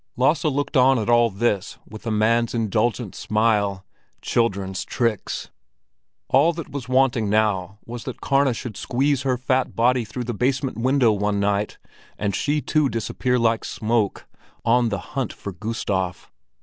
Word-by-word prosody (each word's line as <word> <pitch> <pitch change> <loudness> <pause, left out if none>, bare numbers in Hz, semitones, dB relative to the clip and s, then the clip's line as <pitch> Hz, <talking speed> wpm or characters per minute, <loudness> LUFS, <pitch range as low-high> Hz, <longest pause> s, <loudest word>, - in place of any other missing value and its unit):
Lasse 135 +7 +2
looked 145 0 -1
on 130 0 +5
at 110 +1 0
all 120 0 +5
this 100 -1 -1
with 110 +2 -10
a - - 0
man's 115 +2 +2
indulgent 115 0 0
smile—children's 100 -1 -1
tricks! 115 -5 -2 0.8
All 145 +6 +4
that 165 -2 -7
was 135 -3 -6
wanting 130 -5 +2
now 100 -2 +1
was 120 0 -7
that 130 - -6
Karna 135 -2 +2
should 115 -2 -6
squeeze 135 +2 0
her 130 -2 0
fat 130 +1 0
body 125 +1 +3
through 120 +3 -5
the 120 0 -3
basement 130 +1 -1
window 130 -1 +3
one 105 0 0
night, 100 +1 0 0.4
and 100 -2 -1
she 150 +1 0
too 150 -2 +1
disappear 125 +2 -1
like 115 -1 +2
smoke—on 115 +2 -1
the 100 - -1 0.2
hunt 135 -4 -1
for 100 - -7
Gustav. 95 -2 -3
115 Hz, 150 wpm, -23 LUFS, 105-130 Hz, 0.8 s, on